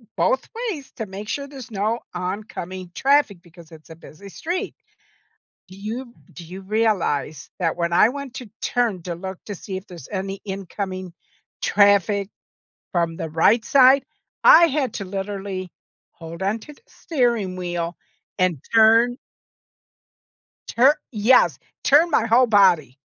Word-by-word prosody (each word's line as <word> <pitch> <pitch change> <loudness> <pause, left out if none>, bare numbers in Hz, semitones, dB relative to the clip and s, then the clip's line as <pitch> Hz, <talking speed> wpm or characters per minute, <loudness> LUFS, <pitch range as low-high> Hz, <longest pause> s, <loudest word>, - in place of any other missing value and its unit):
both - - +1 0.2
ways 285 -6 -8
to 225 - -3
make 200 +1 -8
sure 280 -1 -3
there's 270 -4 -10
no 220 +2 -1 0.2
oncoming 185 -1 -5
traffic 275 -10 +2
because 170 -1 -17
it's 155 -1 -15
a - - -9
busy 165 +4 -13
street. 350 - -4 0.9
Do 185 - -13
you 235 +5 -6 0.2
do 175 - -10
you 185 +4 -9
realize 190 -9 -1
that 165 -2 0
when 170 0 -1
I 195 +5 +6
went 280 -2 -7
to 250 - -8
turn 225 -8 0
to 175 -1 -4
look 190 +2 -7
to 205 - -5
see 190 +1 -7
if 190 +2 -8
there's 175 -2 -11
any 195 0 -4
incoming 190 -2 -5 0.5
traffic 200 -1 +3 0.7
from 170 -2 0
the 165 - -4
right 200 +9 +3
side, 270 0 +6 0.4
I - - +9
had 280 -6 -1
to 200 - -4
literally 195 -1 -5 0.4
hold 165 +1 -10
on 210 +4 0
to 295 - -12
the - - -25
steering 235 - -1
wheel 175 -1 -3 0.4
and 180 -6 +1 0.2
turn 225 +2 +5 1.5
tur 270 +6 +4
yes. 235 +3 +4 0.3
Turn 305 +5 +5
my 230 -7 +2
whole 245 +3 +5
body. 185 - +3
200 Hz, 145 wpm, -22 LUFS, 180-240 Hz, 1.5 s, I